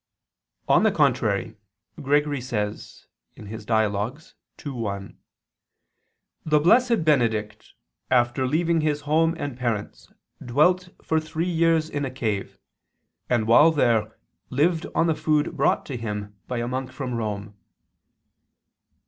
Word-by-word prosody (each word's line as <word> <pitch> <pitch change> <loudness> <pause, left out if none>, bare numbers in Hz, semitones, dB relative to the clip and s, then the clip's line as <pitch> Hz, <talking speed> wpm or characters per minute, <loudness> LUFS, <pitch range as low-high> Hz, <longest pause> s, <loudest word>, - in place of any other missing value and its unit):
On - - +5
the - - +3
contrary, - - +1 0.4
Gregory 145 0 +1
says 105 -5 -5 0.3
(Dial. 110 +2 -1 0.5
ii, 145 - -3
1): 100 -6 -5 1.3
The 150 -1 +3
Blessed 230 +3 +3
Benedict 110 -7 0 0.4
after 125 +1 +2
leaving 165 +3 +1
his 150 -1 0
home 160 +3 +2
and 145 -5 -4
parents 115 -5 -4 0.3
dwelt 180 +9 +2
for 160 - +1
three 155 +2 -3
years 165 -1 +2
in 145 -2 -3
a 135 - -2
cave, 110 -6 -3 0.7
and 120 -3 +1
while 135 +8 +6
there 115 -8 +1 0.3
lived 160 +5 +1
on 165 - +3
the 165 - +2
food 150 -1 0
brought - - +1
to 135 - -5
him 105 -2 -5
by 125 - -3
a 120 0 -2
monk 130 +1 -4
from 130 -3 -5
Rome. 105 -2 -4
130 Hz, 125 wpm, -24 LUFS, 110-155 Hz, 1.3 s, while